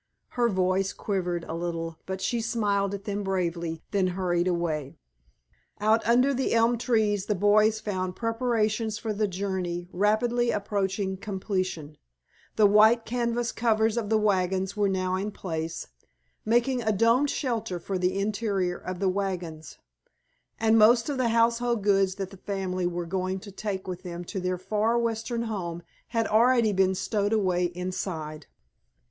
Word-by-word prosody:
Her 240 Hz, -1 st, +1 dB
voice 185 Hz, 0 st, +1 dB
quivered 180 Hz, -4 st, -2 dB
a 160 Hz, -, -6 dB
little 165 Hz, -1 st, -4 dB
but 190 Hz, 0 st, -4 dB
she 230 Hz, +4 st, 0 dB
smiled 205 Hz, -3 st, 0 dB
at 200 Hz, -, -9 dB
them 205 Hz, 0 st, -3 dB
bravely, 170 Hz, -4 st, -2 dB
then 195 Hz, -2 st, +2 dB
hurried 180 Hz, -1 st, 0 dB
away. 160 Hz, -6 st, -2 dB, 0.8 s
Out 215 Hz, +2 st, +3 dB
under 250 Hz, +4 st, +4 dB
the 265 Hz, 0 st, 0 dB
elm 230 Hz, +1 st, +3 dB
trees 215 Hz, -5 st, +1 dB
the 210 Hz, -, +1 dB
boys 210 Hz, +3 st, +4 dB
found 185 Hz, -3 st, -3 dB
preparations 225 Hz, -2 st, 0 dB
for 220 Hz, -1 st, -3 dB
the 210 Hz, +1 st, 0 dB
journey 180 Hz, -2 st, -3 dB
rapidly 235 Hz, +5 st, +2 dB
approaching 195 Hz, -2 st, -1 dB
completion. 185 Hz, -6 st, -3 dB, 0.6 s
The 215 Hz, -, +5 dB
great 200 Hz, -, +4 dB
white 220 Hz, +2 st, +6 dB
canvas 240 Hz, 0 st, -1 dB
covers 220 Hz, -1 st, +1 dB
of 225 Hz, -4 st, -2 dB
the 220 Hz, -, +4 dB
wagons 190 Hz, -2 st, +1 dB
were 205 Hz, -1 st, +2 dB
now 185 Hz, -1 st, -1 dB
in 195 Hz, +3 st, -1 dB
place, 165 Hz, -5 st, -4 dB, 0.6 s
making 240 Hz, +3 st, +2 dB
a 220 Hz, -1 st, +1 dB
domed 230 Hz, +7 st, +3 dB
shelter 225 Hz, -, -2 dB
for 190 Hz, +2 st, -3 dB
the 180 Hz, +1 st, 0 dB
interior 200 Hz, -3 st, -1 dB
of 185 Hz, 0 st, -5 dB
the 195 Hz, +1 st, 0 dB
wagons, 180 Hz, -5 st, -4 dB, 0.8 s
and 225 Hz, 0 st, +4 dB
most 235 Hz, +4 st, +5 dB
of 285 Hz, -, -2 dB
the 245 Hz, -2 st, +2 dB
household 230 Hz, -1 st, +2 dB
goods 195 Hz, -2 st, +3 dB
that 195 Hz, -1 st, -5 dB
the 195 Hz, -, -11 dB
family 185 Hz, -2 st, -2 dB
were 175 Hz, 0 st, -3 dB
going 185 Hz, +2 st, -2 dB
to 200 Hz, -, -10 dB
take 195 Hz, -1 st, -4 dB
with 180 Hz, -1 st, -5 dB
them 175 Hz, -1 st, -6 dB
to 190 Hz, +3 st, -5 dB
their 185 Hz, 0 st, -1 dB
far 215 Hz, +5 st, 0 dB
western 230 Hz, 0 st, -1 dB
home 175 Hz, -6 st, -4 dB, 0.2 s
had 230 Hz, -1 st, 0 dB
already 230 Hz, 0 st, +4 dB
been 190 Hz, 0 st, +2 dB
stowed 200 Hz, +2 st, 0 dB
away 185 Hz, -4 st, +2 dB
inside. 175 Hz, -4 st, -4 dB
200 Hz, 160 wpm, -27 LUFS, 185-225 Hz, 0.8 s, white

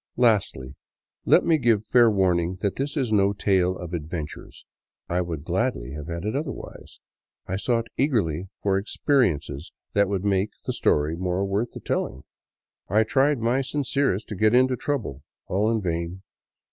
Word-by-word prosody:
Lastly, 105 Hz, -, +2 dB, 0.5 s
let -, -, +5 dB
me 160 Hz, -2 st, +3 dB
give 115 Hz, -4 st, +2 dB
fair 120 Hz, +1 st, +5 dB
warning 90 Hz, -3 st, +1 dB
that 100 Hz, -2 st, 0 dB
this 140 Hz, +2 st, -3 dB
is 130 Hz, -6 st, 0 dB
no 100 Hz, -1 st, +3 dB
tale 95 Hz, -2 st, +1 dB
of 90 Hz, -1 st, -7 dB
adventures. 80 Hz, -2 st, -6 dB, 0.4 s
I 90 Hz, +1 st, 0 dB
would 80 Hz, -5 st, -4 dB
gladly -, -, -1 dB
have 75 Hz, +1 st, -7 dB
had 85 Hz, +2 st, -5 dB
it 110 Hz, -, -1 dB
otherwise. 145 Hz, -1 st, -6 dB, 0.5 s
I 95 Hz, -, -2 dB
sought 115 Hz, +2 st, 0 dB
eagerly 95 Hz, -, 0 dB
for 95 Hz, -1 st, +2 dB
experi 125 Hz, -, +2 dB
ences 70 Hz, +1 st, -9 dB, 0.2 s
that 100 Hz, -1 st, +3 dB
would 100 Hz, -1 st, -2 dB
make 100 Hz, +1 st, +1 dB
the -, -, -1 dB
story 75 Hz, +2 st, +1 dB
more 90 Hz, +2 st, -1 dB
worth 100 Hz, +5 st, -1 dB
the -, -, -7 dB
telling; 65 Hz, -, -2 dB, 0.7 s
I 105 Hz, +4 st, +4 dB
tried 135 Hz, +6 st, +2 dB
my 120 Hz, +4 st, +2 dB
sincerest 135 Hz, -5 st, -1 dB
to 105 Hz, -, -4 dB
get 110 Hz, +4 st, +3 dB
into 130 Hz, 0 st, +4 dB
trouble; 120 Hz, -, -3 dB, 0.2 s
all 105 Hz, +4 st, +1 dB
in 115 Hz, -1 st, +1 dB
vain. 85 Hz, +2 st, -3 dB
100 Hz, 165 wpm, -25 LUFS, 85-120 Hz, 0.7 s, let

